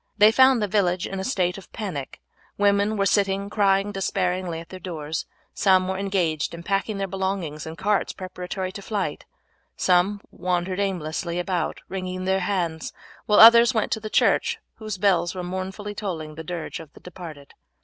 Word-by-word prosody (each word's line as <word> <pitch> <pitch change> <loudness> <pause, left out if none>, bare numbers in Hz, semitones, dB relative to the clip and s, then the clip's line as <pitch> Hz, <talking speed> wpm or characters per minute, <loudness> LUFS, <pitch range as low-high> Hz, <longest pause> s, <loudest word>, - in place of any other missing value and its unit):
They 210 +1 +7
found 260 -1 +5
the - - +1
village 185 -3 +1
in 195 - -4
a - - -3
state 185 -5 0
of 190 - -17
panic. 170 -11 -5 0.4
Women 205 +1 +2
were 195 - +2
sitting 200 0 +1
crying 200 -1 +2
despairingly 185 -3 -1
at 165 - -11
their 185 - -8
doors. 160 -3 -4 0.3
Some 185 -2 +3
were 190 0 -2
engaged 180 -6 0
in 170 - -9
packing 200 +3 -1
their 195 0 -2
belongings 190 -5 -3
in 160 - -6
carts 205 +3 0
preparatory 185 0 -5
to 200 - -8
flight, 200 -1 -3 0.5
some 185 +3 +3
wandered 180 +1 -2
aimlessly 170 -3 -2
about 180 0 -2
wringing 185 -1 -4
their 190 0 +2
hands, 175 -5 -2 0.4
while 210 - +5
others 235 +2 +9
went 220 - 0
to - - 0
the 215 0 -6
church, - - +2 0.2
whose 215 -3 -5
bells 180 -3 +2
were 180 - -4
mournfully 190 +3 -5
tolling 170 -7 -5
the 160 +1 -8
dirge 170 0 -5
of 160 -3 -11
the - - -15
departed. 160 -6 -10
190 Hz, 175 wpm, -24 LUFS, 175-200 Hz, 0.5 s, others